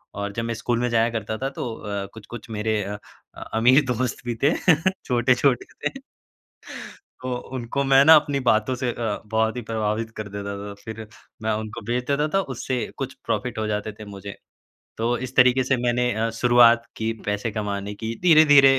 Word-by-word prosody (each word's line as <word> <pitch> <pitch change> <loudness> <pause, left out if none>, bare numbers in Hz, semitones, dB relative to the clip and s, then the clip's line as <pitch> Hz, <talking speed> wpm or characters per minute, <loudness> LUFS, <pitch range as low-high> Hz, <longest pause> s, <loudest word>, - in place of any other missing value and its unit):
और 100 0 -3
जब 115 +2 -3
मैं 115 0 -2
स्कूल 120 +1 -1
में 125 - +1
जाया 115 0 +2
करता 110 +1 -4
था 135 +3 -2
तो 120 -4 -5
अ, 100 -2 -4
कुछ-कुछ 110 +1 -10
मेरे 110 0 -1
अ, 105 +1 -5 0.6
अमीर 125 +6 +5
दोस्त 125 0 -3
भी 120 -1 -2
थे 150 - +5 0.5
छोटे-छोटे 125 +1 +2 0.2
थे। 270 - -11 1.2
तो 130 - -2 0.2
उनको 130 +3 -2
मैं 135 0 +6
ना 160 - +10
अपनी 145 -2 +2
बातों 120 0 +2
से 125 0 -2
अ, 110 -3 -3
बहुत 110 +2 0
ही - - -3
प्रभावित 110 0 -2
कर 110 - -5
देता 100 0 -5
था। 100 0 -7
फ़िर 110 -1 -7 0.4
मैं 110 - +1
उनको 110 +2 -5
बेच 125 +1 -1
देता 145 +2 +1
था - - +5
उससे 130 +1 -3 0.2
कुछ 135 -1 -4
प्रॉफ़िट 115 +1 -2
हो 110 - -1
जाते 105 0 -2
थे 110 - -8
मुझे। 100 0 -8 0.6
तो 120 +2 +1
इस 130 0 -6
तरीके 125 0 +5
से 130 +1 +2
मैंने 125 0 +1
अ, 110 +2 0
शुरुआत 120 -1 +6
की 110 0 -1
पैसे 105 +2 -1
कमाने 100 -1 -3
की। 110 +2 -4
धीरे-धीरे 145 -5 +7
115 Hz, 185 wpm, -23 LUFS, 110-125 Hz, 1.2 s, ना